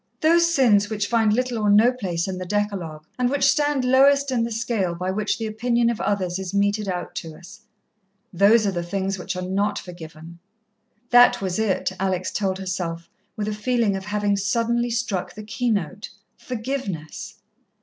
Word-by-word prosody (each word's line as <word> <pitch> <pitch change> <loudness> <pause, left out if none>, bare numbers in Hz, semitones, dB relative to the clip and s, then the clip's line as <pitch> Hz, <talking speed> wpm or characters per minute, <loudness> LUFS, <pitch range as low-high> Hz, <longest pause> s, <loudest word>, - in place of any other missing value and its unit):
Those 335 +2 +4
sins 215 -9 +3
which 210 -2 -1
find 225 -1 +2
little 245 +1 0
or 210 -1 +1
no 215 +4 +6
place 185 -9 -3
in 185 -1 -4
the 185 - -5
decalogue, 190 -7 -3
and 250 -1 +2
which 280 +1 -1
stand 285 -1 +2
lowest 275 +2 +4
in 240 -3 +1
the 235 - -3
scale 220 -6 -1
by 180 +2 -2
which 210 +2 -1
the 225 - -4
opinion 235 +2 +1
of 235 - -5
others 190 -3 -1
is 190 0 -5
meted 205 +1 +1
out 180 -1 -4
to 160 -1 -6
us. 205 +7 -14 0.7
Those 205 +5 +5
are 200 - +1
the 175 -2 -2
things 190 +2 -3
which 185 +1 -4
are 180 - -4
not 200 +3 -1
forgiven. 170 -1 -10 0.7
That 245 0 +7
was 190 0 -2
it, 210 -3 0
Alex 185 -1 -1
told 190 -2 -1
herself, 180 -3 -4 0.2
with 210 -1 -3
a 215 - -1
feeling 220 -1 0
of 190 0 -5
having 205 -1 0
suddenly 235 +4 0
struck 225 -6 -2
the 215 - -8
keynote. 210 - -2 0.3
Forgiveness. 220 - -5
205 Hz, 180 wpm, -23 LUFS, 185-235 Hz, 0.7 s, That